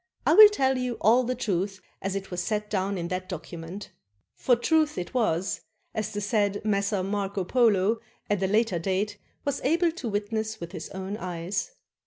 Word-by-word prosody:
I 300 - +5
will 425 +4 +11
tell 265 -10 +1
you 250 -1 -2
all 240 +4 +5
the 250 +1 -1
truth 195 -4 -1 0.2
as 195 0 -2
it 195 -1 -5
was 180 0 -2
set 210 +1 -2
down 195 -1 0
in 170 -1 -3
that 185 0 -3
docu 170 -1 -6
ment. 175 +5 -8 0.4
For 250 - +3
truth 310 +5 +2
it 175 +5 -4
was, 195 -7 0 0.3
as 215 -1 -2
the 205 - -3
said 205 -1 0
Messer 200 -2 +1
Marco 200 0 -2
Polo 220 -1 +3 0.3
at 205 -2 0
a 190 - +2
later 210 -3 +2
date 200 +4 -1 0.3
was 285 -1 -1
able 335 +5 +2
to 275 -8 -5
witness 220 +1 -2
with 170 0 -7
his 170 -4 -7
own 190 +2 -5
eyes. 180 - -3
205 Hz, 190 wpm, -27 LUFS, 190-235 Hz, 0.4 s, will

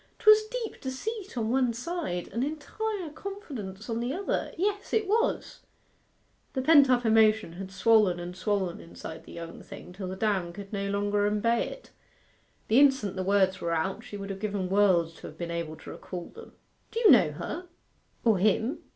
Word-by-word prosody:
''Twas 430 0 +6
deep - - -5
deceit 385 - -5
on 225 -1 0
one 255 -2 +2
side, 245 - -3
and 235 - -2
entire 345 +5 -3
confidence 280 - -7
on 230 -1 -2
the 240 +2 -2
other 380 +7 -2
yes, 405 +3 -1
it 430 -3 +2
was!' 455 +4 0 0.9
The 260 - -1
pent 285 -2 +7
up 245 -1 +3
emotion 220 -4 +4
had 190 +2 -7
swollen 210 -3 +4
and 175 +1 -6
swollen 185 -1 -1
inside 160 -1 -9
the - - -12
young 170 0 -8
thing 180 - -11
till 185 0 -6
the 185 - -4
dam 190 -4 0
could 200 +2 -9
no 200 0 -2
longer 205 +1 +1
embay 230 +3 +1
it. - - -11 0.8
The 225 +4 +5
instant 265 -9 +4
the 190 - -2
words 190 0 +2
were 170 0 0
out 190 +7 -2
she 225 -4 -8
would 200 0 -5
have 195 - -6
given 200 -3 -2
worlds 185 -5 +3
to - - -9
have 155 - -12
been 170 0 -4
able 170 -2 -3
to - - -10
recall 175 -2 -7
them. 460 - -13 0.4
'Do 460 - -3
you 460 - +7
know - - +6
her 360 +1 -6 0.6
or 220 -5 +4
him? 220 - +2
215 Hz, 185 wpm, -28 LUFS, 190-290 Hz, 0.9 s, pent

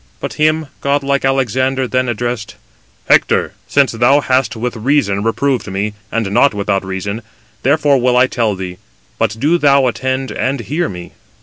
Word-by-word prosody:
But - - -5
him 155 +1 +1 0.2
godlike 140 0 0
Alexander 130 0 +1
then 130 0 0
addressed: 120 -2 -3 0.5
"Hector, - - +3
since 140 -2 +3
thou 120 +5 +3
hast 130 -3 +1
with 120 +2 -3
reason 110 -4 +1
reproved 125 +3 0
me, 100 +2 -2 0.2
and 110 -3 -1
not 125 +3 +3
without 100 -1 -1
reason, 95 +3 -4 0.4
therefore 140 0 +3
will 125 0 +2
I 125 - +6
tell 115 -5 -1
thee; 90 -1 -6 0.4
but 110 -1 0
do 160 +7 +2
thou 140 -2 +4
attend 130 +2 -2
and 130 +1 -1
hear 150 - -2
me. 90 -1 -8
125 Hz, 160 wpm, -16 LUFS, 110-140 Hz, 0.5 s, I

